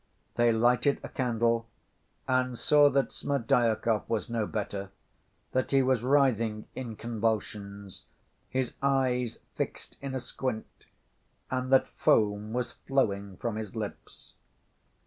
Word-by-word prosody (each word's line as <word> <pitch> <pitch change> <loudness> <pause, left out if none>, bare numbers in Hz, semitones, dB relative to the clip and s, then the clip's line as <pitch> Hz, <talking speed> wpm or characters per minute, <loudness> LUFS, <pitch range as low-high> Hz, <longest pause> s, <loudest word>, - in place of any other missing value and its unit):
They 120 0 +4
lighted 120 +5 +3
a - - -6
candle 115 -2 +1 0.6
and 130 -1 +1
saw 145 +2 +5
that 135 0 +1
Smerdyakov 115 -4 +1
was 115 0 -1
no 115 -3 0
better, 100 -2 -4 0.6
that 130 - 0
he 135 -1 +4
was 130 -3 +2
writhing 120 -5 +2
in 120 -4 -5
convulsions, 105 -3 -3 0.4
his 130 -2 -1
eyes 130 -3 +1 0.2
fixed - - -4
in 135 -1 -4
a - - 0
squint, 125 -2 -5 0.7
and 130 0 -1
that 135 - +5
foam 105 0 +2
was 125 +1 -1
flowing 100 -8 -1
from 115 -2 -3
his 110 -1 -6
lips. 105 -2 -7
120 Hz, 125 wpm, -29 LUFS, 110-130 Hz, 0.7 s, saw